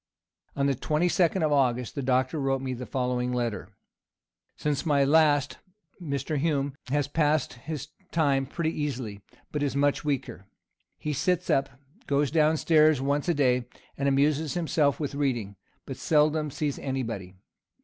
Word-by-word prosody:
On 140 - +1
the 140 - +3
twenty 150 +6 0
second 175 0 +2
of 155 - +2
August, 125 -4 +1
the 140 - -3
doctor 130 +3 +1
wrote 135 -1 0
me 130 -1 -3
the 125 0 -7
following 125 -1 -1
letter; 120 -6 -2 0.9
"Since 150 -2 -1
my 145 -3 +3
last, 145 -1 +3 0.4
Mr. 140 -1 -2
Hume 140 -2 0
has 145 +1 0
passed 150 0 +1
his 145 +4 -7 0.2
time 140 -5 +2
pretty 160 +3 -2
easily, 130 -10 -4 0.3
but 150 - -2
is 140 -1 -1
much 145 0 +1
weaker. 135 -9 -3 0.5
He 150 - -3
sits 180 +5 0
up, 135 0 +2 0.4
goes 140 0 +1
down 155 0 +3
stairs 155 -2 +4
once 140 +4 0
a 170 - +2
day, 125 -3 +2 0.3
and 140 - -1
amuses 145 +3 +1
himself 155 -4 +1
with 145 -3 -3
reading, 120 -8 -1 0.3
but - - -6
seldom 150 0 +2
sees 145 0 -3
any 135 -1 -2
body. 95 -5 -6
140 Hz, 160 wpm, -27 LUFS, 130-150 Hz, 0.9 s, stairs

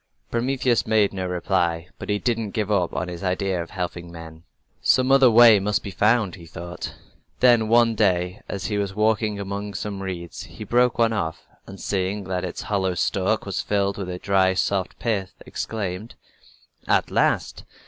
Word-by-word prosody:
Prometheus 125 0 +1
made 105 -3 +3
no 95 -1 -3
reply, 85 -2 0
but - - -7
he 105 - +2
didn't 115 -2 -2
give 105 -1 -1
up 90 -4 +1 0.2
his 90 +1 -7
idea 95 -1 0
of 85 - -7
helping 90 -2 -5
men. 80 -1 -10 0.4
"Some 130 +1 +3
other 135 -2 +7
way 115 -2 +8
must 105 +2 0
be 100 - -6
found," 105 0 +2
he 85 -4 -11
thought. 85 +3 -7 0.4
Then, 120 -3 +5
one 115 0 +4
day, 90 -3 +1
as 95 -2 -4
he 105 0 -1
was 100 -1 -3
walking 105 -1 +1
among 100 +1 -5
some 100 -1 -4
reeds 90 -3 -6
he - - -10
broke 125 0 +2
off 110 -9 0
one, - - -29
and 95 0 -10
seeing 100 +1 -2
that 90 -1 -3
its 90 - -5
hollow 95 -3 -1
stalk - - 0
was - - -2
filled 100 -1 0
with 95 -2 -4
a 90 - -4
dry, 95 0 +2
soft 95 0 -1
pith, 100 -5 -2
exclaimed: 105 -1 -5 0.7
"At - - +2
last! - - +1
100 Hz, 175 wpm, -23 LUFS, 90-110 Hz, 0.7 s, way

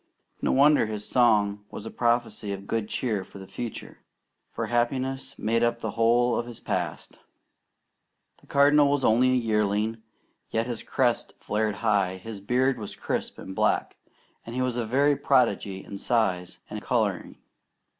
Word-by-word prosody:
No - - +1
wonder 145 -3 +5
his 105 -1 -5
song 105 -4 +3
was 105 - -8
a - - -6
prophecy 120 -3 0
of 100 0 -7
good 110 0 -2
cheer 110 -7 -1
for 100 - -14
the 95 - -9
future, 120 +4 -7 0.5
for - - -3
happiness 130 +3 -1
made 115 +2 0
up 120 0 +2
the 110 -2 -4
whole 120 +2 +3
of 120 - -4
his 120 -2 -9
past. - - -4 1.2
The - - -24
Cardinal 145 +1 +5
was 140 -1 +1
only 120 +4 +4
a - - +3
yearling, 110 -1 0 0.5
yet 115 +1 0
his 120 -2 -4
crest 120 0 0
flared 105 0 -1
high, 100 -4 +2
his 105 +1 -8
beard 125 +4 +1
was 105 - -6
crisp - - -3
and 95 - -8
black, - - +1 0.5
and 115 - -8
he 130 - 0
was 125 -2 -1
a 120 -2 -2
very 140 +5 +3
prodigy 120 -8 +1
in 100 - -8
size 95 -7 0
and - - -6
colouring. - - -1
115 Hz, 165 wpm, -26 LUFS, 105-125 Hz, 1.2 s, wonder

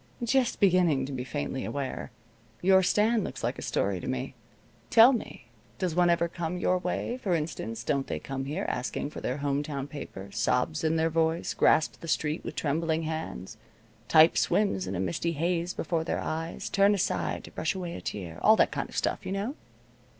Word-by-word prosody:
"Just 250 +1 +1
beginning 175 -8 +4
to 140 - -6
be 130 -2 -3
faintly 135 -1 -3
aware. 140 -2 -4 0.5
Your 190 +1 +6
stand 215 +4 +2
looks - - -6
like - - -1
a - - -5
story 100 -2 -1
to - - -7
me. 130 +1 -3 0.6
Tell 230 +4 +8
me, 135 - -6 0.3
does 185 -3 -1
one 175 +1 +4
ever 170 0 +3
come 170 0 -4
your 180 0 +1
way? 180 +7 -2
For 185 -7 +1
instance, 115 -8 -4
don't 140 -2 0
they - - -2
come 135 -1 -5
here 155 +8 -3
asking 135 +3 -3
for - - -7
their 125 - -2
home 140 0 0
town 145 -2 -4
paper 135 -9 -8
sobs 125 +10 0
in 160 0 +2
their 165 0 +1
voice 165 +1 +1
grasp 160 - +3
the 165 - -7
sheet 155 -1 -1
with - - -6
trembling 160 +2 0
hands 155 - -5 0.5
type 160 +1 +6
swims 95 - +1
in 95 - -3
a - - -2
misty 95 - -1
haze 170 +2 0
before 165 -3 -2
their 160 - -1
eyes 165 +1 -4
turn 200 +1 +4
aside 195 - -1
to - - -11
brush - - -2
away 175 -2 -4
a - - -7
tear 85 -5 -6
all 220 - +7
that - - +3
kind - - -3
of - - -8
stuff, - - 0
you - - -5
know?" 200 +7 -2
160 Hz, 200 wpm, -28 LUFS, 135-180 Hz, 0.6 s, Tell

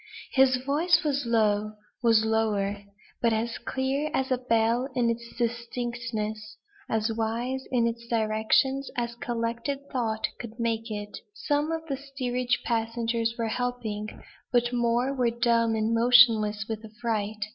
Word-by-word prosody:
His 265 -1 +5
voice 305 +6 +2
was 285 -4 0
low 215 -2 +2 0.3
was 225 -2 +4
lower; 205 -2 0 0.4
but 230 -1 +3
as 230 +2 -2
clear 270 +3 -1
as 265 0 -1
a 255 - +2
bell 235 +1 +1
in 240 -2 +2
its 235 0 -6
distinctness; 230 -2 -3 0.3
as 220 0 0
wise 235 +4 -2
in 240 -2 +3
its 235 0 -3
directions 230 +5 +1
as 235 -1 -1
collected 235 +3 -2
thought 225 -4 -1
could 235 0 -8
make 230 0 -1
it. 205 -1 -5 0.2
Some 295 -3 0
of 325 0 -3
the 275 -4 -3
steerage 255 -3 -2
passengers 230 0 0
were 230 -1 -1
helping; 225 -3 -3 0.3
but 240 0 +2
more 240 +2 +1
were 250 -3 +2
dumb 230 -1 +2
and 220 +1 0
motionless 230 -3 +5
with 220 -1 -4
affright. 220 -2 -3
235 Hz, 140 wpm, -27 LUFS, 220-250 Hz, 0.4 s, His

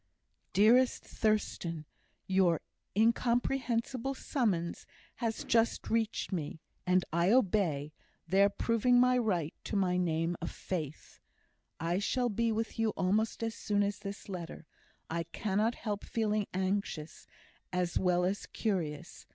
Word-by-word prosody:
DEAREST 240 +5 +5
THURSTAN, 175 -7 -1 0.4
Your 185 -4 +3 0.4
incomprehensible 245 +2 +1
summons 195 - -1 0.3
has 230 -3 -2
just 230 0 +1
reached 225 -2 0
me, 160 -4 -3 0.3
and 180 0 +3
I 170 +2 +3
obey, 180 - +2 0.3
thereby 195 +3 +4
proving 240 +2 +3
my 250 0 +5
right 180 -9 0
to - - -3
my 185 -2 +2
name 165 -1 0
of 165 - -2
Faith. 155 -5 -5 0.6
I 170 +3 0
shall 245 +4 +1
be 230 +2 +1
with 225 +1 -2
you 225 -1 +3
almost 215 +5 +1
as 225 -1 -1
soon 205 -2 0
as 200 0 -2
this 200 -1 -7
letter. 175 -4 -6 0.4
I 170 +1 -2
cannot 210 +6 0
help 210 -3 -4
feeling 215 -2 0
anxious, 185 -4 -2 0.4
as 180 -1 0
well 180 -1 +2
as 195 +2 -2
curious. 175 -5 -3
200 Hz, 125 wpm, -32 LUFS, 175-225 Hz, 0.6 s, DEAREST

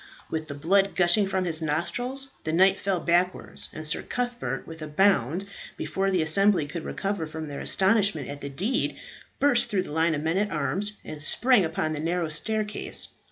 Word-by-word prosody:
With 160 -1 -3
the 145 - -6
blood 195 +7 +2
gushing 185 +3 +4
from 190 -1 -1
his 165 -2 0
nostrils, 245 - -2
the 155 - -2
knight 190 +4 +4
fell 195 -2 0
backwards, 175 +2 0
and 155 - -7
Sir 150 - +1
Cuthbert, 240 - -3
with 160 -1 -10
a 155 - -5
bound, 175 - +2 0.3
before 195 0 -1
the 185 -4 +1
assembly 190 +1 +3
could 155 +3 -6
recover 195 -5 -3
from 155 0 -6
their 145 -1 -6
astonishment 195 - +1
at 145 0 -7
the 140 - -5
deed, 195 - -1 0.4
burst 270 -4 +3
through 195 -4 0
the - - -9
line 160 +1 +2
of 145 - -4
men 165 +4 +1
at 210 0 0
arms, 190 +7 -1
and 150 - -4
sprang 240 - +5
up 160 0 -6
the - - 0
narrow 165 +1 -1
staircase. 210 +6 0
175 Hz, 190 wpm, -26 LUFS, 155-200 Hz, 0.4 s, sprang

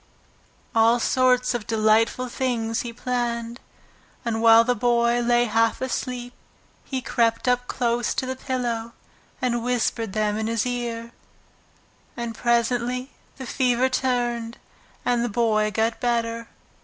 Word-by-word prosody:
All 230 +1 +4
sorts 250 0 +2
of 240 -3 -4
delightful 225 +3 +2
things 240 -3 -1
he 240 - -5
planned, 235 -1 -3 0.7
and 225 -1 -1
while 230 0 +7
the 250 +1 +1
Boy 240 0 +2
lay 240 0 +3
half 225 0 +1
asleep 250 -1 -4 0.5
he 260 -2 -4
crept 230 0 +1
up 245 0 +1
close 240 -1 0
to - - -1
the 260 0 -3
pillow 240 -3 -3 0.5
and 240 -2 0
whispered 230 -3 -1
them 210 -1 0
in 220 - -2
his 230 0 0
ear. 235 -2 -3 1.1
And 235 -1 -4
presently 240 +2 0 0.3
the 265 - -7
fever 250 +1 +1
turned, 240 -3 -1 0.5
and 240 -1 +2
the 240 - -1
Boy 215 -1 +2
got 225 +2 0
better. 230 -1 -1
235 Hz, 130 wpm, -24 LUFS, 230-250 Hz, 1.1 s, while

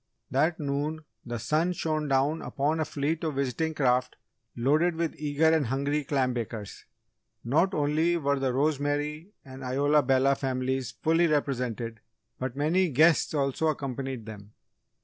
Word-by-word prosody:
That 155 +6 +1
noon, 150 +2 -2 0.2
the 120 -1 -4
sun 155 +9 0
shone 155 -3 -2
down 140 +4 +1
upon 150 +3 -1
a 155 - +1
fleet 150 +4 -2
of 155 -3 -2
visiting 140 +4 -1
craft 125 -2 +1 0.4
loaded 155 +8 +2
with 165 -1 -1
eager 150 +1 +1
and 160 -5 +2
hungry 140 +4 0
clam 130 -2 0
bakers. 110 -3 -6 0.6
Not 165 - +2
only 155 +4 +2
were 140 -3 0
the 135 -1 0
Rosemary 145 +4 -1 0.2
and 135 0 -10
Isola 145 +4 +3
Bella 135 +1 +3
families 130 -2 -2
fully 160 +9 +2
represented 125 -6 -1 0.4
but 130 -1 -3
many 165 +6 +2
guests 155 +3 +4
also 140 +2 0
accompanied 135 -5 -3
them. 105 -1 -10
140 Hz, 145 wpm, -28 LUFS, 130-155 Hz, 0.6 s, guests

